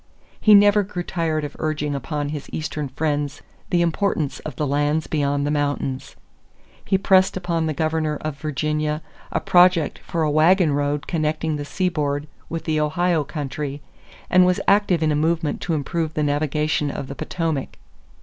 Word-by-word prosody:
He 215 Hz, -1 st, +7 dB
never 205 Hz, +1 st, +6 dB
grew 185 Hz, -3 st, -4 dB
tired 160 Hz, -3 st, -1 dB
of 145 Hz, -1 st, -6 dB
urging 150 Hz, -2 st, -1 dB
upon 145 Hz, +1 st, -3 dB
his 150 Hz, -1 st, -6 dB
Eastern 155 Hz, -2 st, -3 dB
friends 145 Hz, 0 st, -2 dB, 0.3 s
the 175 Hz, -1 st, +3 dB
importance 165 Hz, -4 st, 0 dB
of 155 Hz, -, -7 dB
the 150 Hz, -, -1 dB
lands 145 Hz, +3 st, +1 dB
beyond 145 Hz, -2 st, 0 dB
the 145 Hz, -, 0 dB
mountains. 145 Hz, -2 st, -2 dB, 0.7 s
He 190 Hz, -, +2 dB
pressed 190 Hz, 0 st, +3 dB
upon 170 Hz, -3 st, -1 dB
the 155 Hz, -, -1 dB
governor 155 Hz, 0 st, 0 dB
of 155 Hz, -2 st, -4 dB
Virginia 150 Hz, +1 st, -1 dB, 0.3 s
a -, -, 0 dB
project 175 Hz, -3 st, +4 dB
for 165 Hz, -1 st, -2 dB
a 150 Hz, -, +1 dB
wagon 160 Hz, +1 st, +4 dB
road 145 Hz, 0 st, -1 dB
connecting 155 Hz, -1 st, -1 dB
the 145 Hz, -1 st, -4 dB
seaboard 150 Hz, -3 st, -1 dB, 0.2 s
with 165 Hz, 0 st, -4 dB
the 155 Hz, -1 st, 0 dB
Ohio 160 Hz, +2 st, +1 dB
country 145 Hz, -1 st, -5 dB, 0.4 s
and 185 Hz, 0 st, +5 dB
was 180 Hz, 0 st, +2 dB
active 195 Hz, -5 st, +3 dB
in 155 Hz, -, +2 dB
a -, -, +1 dB
movement 160 Hz, 0 st, 0 dB
to 170 Hz, -, -1 dB
improve 155 Hz, +2 st, -2 dB
the 150 Hz, -, +1 dB
navigation 150 Hz, +1 st, 0 dB
of 140 Hz, -, -4 dB
the 140 Hz, -, -6 dB
Potomac. 160 Hz, -2 st, -3 dB
155 Hz, 170 wpm, -22 LUFS, 145-170 Hz, 0.7 s, He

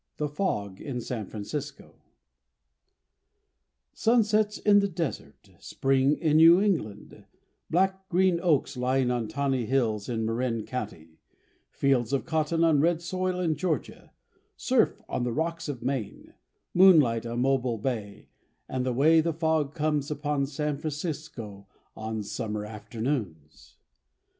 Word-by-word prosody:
The 150 Hz, -, -1 dB
Fog 105 Hz, -, -3 dB
in 135 Hz, -4 st, -4 dB
San 115 Hz, -3 st, -5 dB
Francisco 140 Hz, +7 st, -6 dB, 2.0 s
Sunsets 215 Hz, -2 st, +2 dB
in 205 Hz, -1 st, +5 dB
the 200 Hz, -, +1 dB
desert, 170 Hz, -5 st, -5 dB
spring 135 Hz, +1 st, +1 dB
in 155 Hz, -2 st, +2 dB
New 165 Hz, +3 st, +8 dB
England, 155 Hz, -, -2 dB, 0.4 s
black 190 Hz, +2 st, 0 dB
green 180 Hz, -1 st, +3 dB
oaks 150 Hz, -5 st, +1 dB
lying 125 Hz, 0 st, +1 dB
on 120 Hz, -3 st, -1 dB
tawny 135 Hz, -2 st, -1 dB
hills 115 Hz, -5 st, 0 dB
in 115 Hz, -2 st, -1 dB
Marin 115 Hz, -1 st, -1 dB
County, 80 Hz, -10 st, -7 dB, 0.5 s
fields 135 Hz, -2 st, +1 dB
of 140 Hz, -, 0 dB
cotton 160 Hz, +1 st, 0 dB
on 155 Hz, -4 st, +4 dB
red 170 Hz, +1 st, +2 dB
soil 185 Hz, +1 st, -2 dB
in 170 Hz, -3 st, +1 dB
Georgia, 155 Hz, -2 st, -3 dB, 0.5 s
surf -, -, +1 dB
on -, -, -2 dB
the 120 Hz, -, -1 dB
rocks 165 Hz, +3 st, -2 dB
of 130 Hz, -4 st, -5 dB
Maine, 130 Hz, -5 st, -4 dB, 0.4 s
moonlight 150 Hz, -12 st, +5 dB
on 120 Hz, +1 st, -2 dB
Mobile 130 Hz, -3 st, +1 dB
Bay, 105 Hz, -3 st, -4 dB, 0.4 s
and 130 Hz, -1 st, -2 dB
the 130 Hz, -1 st, -1 dB
way 160 Hz, +6 st, +5 dB
the 165 Hz, +1 st, 0 dB
fog 160 Hz, -2 st, 0 dB
comes 150 Hz, -2 st, 0 dB
upon 145 Hz, -2 st, -1 dB
San 150 Hz, 0 st, -3 dB
Francisco 145 Hz, -, -6 dB, 0.3 s
on 110 Hz, -1 st, -4 dB
summer 105 Hz, 0 st, -4 dB
afternoons. 105 Hz, -, -5 dB
140 Hz, 130 wpm, -27 LUFS, 115-160 Hz, 2.0 s, New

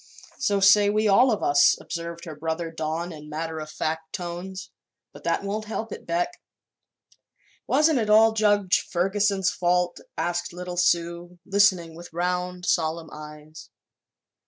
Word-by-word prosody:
"So 205 Hz, -7 st, +1 dB
say 205 Hz, +1 st, +6 dB
we 215 Hz, +1 st, +1 dB
all 240 Hz, +6 st, +5 dB
of 210 Hz, -, -1 dB
us," 145 Hz, 0 st, +5 dB
observed 170 Hz, 0 st, -6 dB
her 160 Hz, -, -7 dB
brother 160 Hz, +2 st, -3 dB
Don 160 Hz, +2 st, -3 dB
in 150 Hz, -1 st, -11 dB
matter 160 Hz, +1 st, -4 dB
of 155 Hz, 0 st, -7 dB
fact 160 Hz, +1 st, -4 dB
tones. 180 Hz, +1 st, -6 dB, 0.4 s
"But -, -, -13 dB
that -, -, 0 dB
won't 210 Hz, +2 st, -3 dB
help 220 Hz, 0 st, -5 dB
it, -, -, -8 dB
Beck." 175 Hz, -, -2 dB, 1.3 s
"Wasn't 305 Hz, -3 st, +3 dB
it 215 Hz, -2 st, -1 dB
all 220 Hz, +1 st, +6 dB
Judge 205 Hz, -3 st, +2 dB
Ferguson's 195 Hz, +1 st, +1 dB
fault?" 180 Hz, 0 st, 0 dB, 0.2 s
asked 175 Hz, 0 st, -2 dB
little 180 Hz, 0 st, -6 dB
Sue, 175 Hz, 0 st, 0 dB
listening 195 Hz, -4 st, +3 dB
with 175 Hz, +1 st, -11 dB
round, 180 Hz, +1 st, -2 dB
solemn 160 Hz, -1 st, 0 dB
eyes. 150 Hz, +1 st, -11 dB
175 Hz, 145 wpm, -25 LUFS, 165-200 Hz, 1.3 s, say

